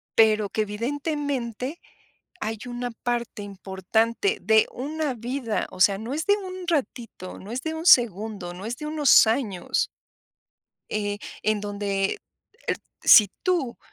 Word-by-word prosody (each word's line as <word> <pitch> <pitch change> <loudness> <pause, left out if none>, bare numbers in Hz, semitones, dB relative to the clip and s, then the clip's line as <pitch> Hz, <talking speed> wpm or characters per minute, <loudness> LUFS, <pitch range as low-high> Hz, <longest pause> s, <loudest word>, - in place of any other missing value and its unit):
pero 215 -2 +5
que, 215 - -1
evidentemente, 265 +3 -3 0.6
hay 220 0 -3
una 245 0 -4
parte 235 -2 -3
importante 205 - -1
de 220 0 +5
una 295 +2 -3
vida, 240 0 -2
o - - -11
sea, 195 +1 +5
no 225 +6 -5
es 310 +2 -2
de 405 - +5
un 370 -3 -7
ratito, 240 - -3
no 200 - -10
es 255 +2 -3
de 320 0 -3
un 320 +1 -5
segundo, 210 - +4
no 185 +3 -9
es 235 +2 -3
de 300 - -6
unos 300 -6 +6
años. 220 -6 0 1.0
Eh, 205 -1 -2 0.2
en 215 0 +1
donde, 200 -1 -1 0.5
eh, - - +3 0.3
si 210 -3 +8
tú 340 -10 0
230 Hz, 140 wpm, -25 LUFS, 205-285 Hz, 1.0 s, si